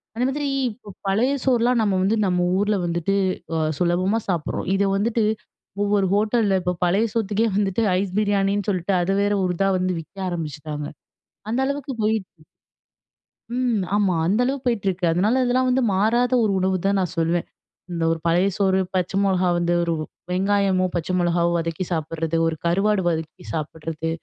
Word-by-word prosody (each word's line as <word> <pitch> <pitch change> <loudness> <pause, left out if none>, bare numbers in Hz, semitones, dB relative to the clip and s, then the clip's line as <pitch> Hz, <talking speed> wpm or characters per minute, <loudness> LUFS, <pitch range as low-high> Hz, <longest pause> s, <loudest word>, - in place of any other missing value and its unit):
அந்த 245 +2 0
மாதிரி 285 +1 -2 0.2
இப்ப 210 -3 -13
பழைய 220 +8 +2
சோறுலாம் 245 -1 +3
நம்ம 205 -3 +1
வந்து 200 +4 +2
நம்ம 180 -1 +1
ஊர்ல 205 +1 +1
வந்துட்டு, 175 +3 0 0.4
அ - - +1 0.2
சுலபமா 185 +5 +1
சாப்பிடுறோம். 170 0 -2
இத 200 - +2
வந்துட்டு 225 +2 +1 0.6
ஒவ்வொரு 200 -2 +2
ஹோட்டல்ல 210 -2 +2
இப்ப 180 0 -1
பழைய 195 +6 +2
சோத்த்துக்கே 220 0 +1
வந்துட்டு 200 +2 +1 0.2
ஐஸ் 195 -2 -3
பிரியாணின்னு 200 -1 +1
சொல்ட்டு, 185 +1 -1
அது 175 +2 0
வேற 205 0 +1
ஒரு 180 - 0
இதா 195 0 +2
வந்து 185 0 0
விக்க 165 +5 -20
ஆரம்பிச்சுட்டாங்க. 150 -3 -5 0.7
அந்த 235 - 0
அளவுக்கு 280 -1 -3
போயிடுச்சு. 215 -2 0 1.3
ம். 245 -4 +1
ஆமா. 195 -4 +2
அந்த 210 +6 +2
அளவுக்கு 270 0 -2
போயிட்டுருக்கு. 195 -6 0
அதனால 215 +9 +2
இதெல்லாம் 255 +1 +2
வந்து 260 +1 +2
மாறாத 235 +6 +2
ஒரு 215 - +2
உணவுதான் 190 +1 +1
நான் 180 -2 -2
சொல்வேன். 165 +1 +1 0.5
இந்த 170 -1 -2
ஒரு 165 - -1
பழைய 175 +4 +3
சோறு, 190 -1 +2 0.2
பச்ச 180 0 0
மொளகா 185 -2 +2
வந்து 175 0 +1
ஒரு 170 - 0 0.4
வெங்காயமோ! 195 0 +2
பச்சை 175 +1 -2
மிளகாவோ! 170 0 +2
வதக்கி 165 +2 -2
சாப்பிட்றது, 165 0 -2
ஒரு 165 - -1
கருவாடு 195 +4 +2
வதக்கி 160 +2 -3
சாப்பிட்றது, 160 0 -4
195 Hz, 160 wpm, -23 LUFS, 175-215 Hz, 1.3 s, சோறுலாம்